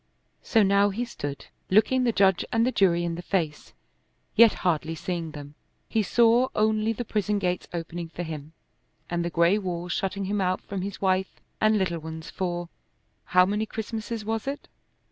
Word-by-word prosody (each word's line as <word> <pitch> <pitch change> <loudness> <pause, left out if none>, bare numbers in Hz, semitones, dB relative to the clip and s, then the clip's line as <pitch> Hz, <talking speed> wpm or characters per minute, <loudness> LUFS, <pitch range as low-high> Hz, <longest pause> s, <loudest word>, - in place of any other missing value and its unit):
So 225 -2 +3
now 200 +1 +4
he 230 +5 -2
stood 145 - -6 0.2
looking 250 +6 +4
the 235 - +3
judge 190 -4 +3
and 230 -1 +3
the 255 - +1
jury 175 -6 +3
in 170 -1 -1
the 170 - -5
face, 165 -5 -2 0.6
yet 230 -1 +8
hardly 165 -2 +1
seeing 170 -1 -3
them. 145 -1 -9 0.3
He 220 - +1
saw 235 +4 +4
only 215 +1 +2
the 235 +2 -4
prison 210 -1 0
gates 180 -2 -1
opening 170 0 -5
for 170 +2 -5
him, 155 -2 -7 0.6
and 170 -1 0
the 170 - -1
gray 170 +4 +3
walls 175 -2 -4
shutting 195 0 -2
him 200 +1 -1
out 185 0 +1
from 195 -2 -5
his 195 +1 -5
wife 190 0 0 0.2
and 215 0 +4
little 175 -4 0
ones 160 0 -8
for 175 -2 -3 0.6
how 180 0 +5
many 210 +3 -1
Christmases 220 0 -5
was 225 +2 -2
it? 280 +1 -4
190 Hz, 180 wpm, -26 LUFS, 170-215 Hz, 0.6 s, yet